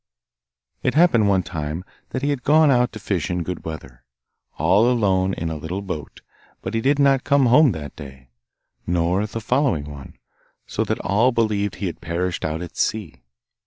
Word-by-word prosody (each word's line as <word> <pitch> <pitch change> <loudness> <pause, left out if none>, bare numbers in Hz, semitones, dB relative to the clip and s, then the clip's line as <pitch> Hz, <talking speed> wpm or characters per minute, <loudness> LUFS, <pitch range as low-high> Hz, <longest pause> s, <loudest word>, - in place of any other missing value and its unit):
It - - 0
happened 135 - +4
one 95 -2 +2
time 80 +1 -5 0.2
that 130 - -4
he 145 - +1
had 140 -3 -2
gone 150 +2 +5
out 125 -1 +3
to 110 - -7
fish 95 -5 -2
in 90 -1 -1
good 90 +1 -5
weather, 65 -6 -8 0.5
all 100 +10 +4
alone 95 -6 +1
in 80 0 -3
a - - -3
little 85 +6 -5
boat, 75 -7 -6 0.4
but 95 - -4
he 115 - 0
did 140 +4 +2
not 140 -2 +3
come 140 -1 +3
home 130 +3 +6
that 75 -3 -7
day, 65 -3 -12 0.6
nor 90 +4 +1
the 115 - -5
following 125 - +1
one, 70 -2 -10 0.5
so - - -2
that - - -1
all 110 +7 +2
believed 105 -4 0
he 100 - -4
had 85 -3 -5
perished 85 +1 -2
out 80 +2 -2
at 85 -1 -10
sea. 105 -7 -2
95 Hz, 185 wpm, -22 LUFS, 80-120 Hz, 0.6 s, home